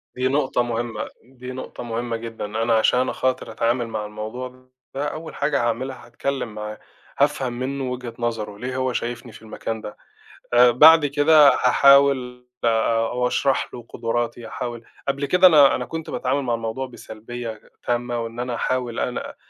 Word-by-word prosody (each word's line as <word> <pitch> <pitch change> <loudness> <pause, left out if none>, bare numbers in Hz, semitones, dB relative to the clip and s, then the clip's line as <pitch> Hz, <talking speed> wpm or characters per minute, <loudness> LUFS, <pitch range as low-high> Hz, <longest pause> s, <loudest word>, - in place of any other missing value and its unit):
دي 130 +1 0
نقطة 135 -2 +1
مهمة، 115 -2 -3 0.2
دي 125 0 -10
نقطة 130 -1 -7
مهمة 115 0 -3
جدًا. 115 -2 -6
أنا 115 +2 0
عشان 125 +3 +3
أخاطر 130 0 -1
أتعامل 120 0 0
مع 110 -2 -4
الموضوع 125 +5 -7 0.3
ده 145 +2 -1
أول 160 +2 -7
حاجة 140 -2 0
هاعملها 130 +2 -3
هاتكلم 120 -2 -4
معاه، 105 0 -6 0.4
هافهم 135 -4 +1
منه 130 +1 -3
وجهة 125 -2 -6
نظره، 110 -3 -3
ليه 130 +3 -5
هو 130 -1 -1
شايفني 120 0 -4
في - - -14
المكان 110 0 -5
ده؟ 105 - -8 0.6
آآ 120 0 +7
بعد 155 +4 +7
كده 145 +1 +6
هاحاول 130 -2 +4 0.2
أو 115 +2 +1
أشرح 135 +1 0
له 120 -2 -9
قدراتي، 120 0 -3
هاحاول 120 0 -6 0.2
قبل 140 +1 -1
كده 180 +5 +6
أنا 145 -5 +6
أنا 125 - -3
كنت 160 +5 -6
باتعامل 135 +2 -1
مع 120 -3 -1
الموضوع 115 +3 -3
بسلبية 120 0 -8
غ 110 -1 -14 0.2
تامة 120 0 -1
وإن 115 +1 -5
أنا 125 0 -2
هاحاول 125 0 -2
أنا 125 - -3
125 Hz, 165 wpm, -22 LUFS, 115-130 Hz, 0.6 s, آآ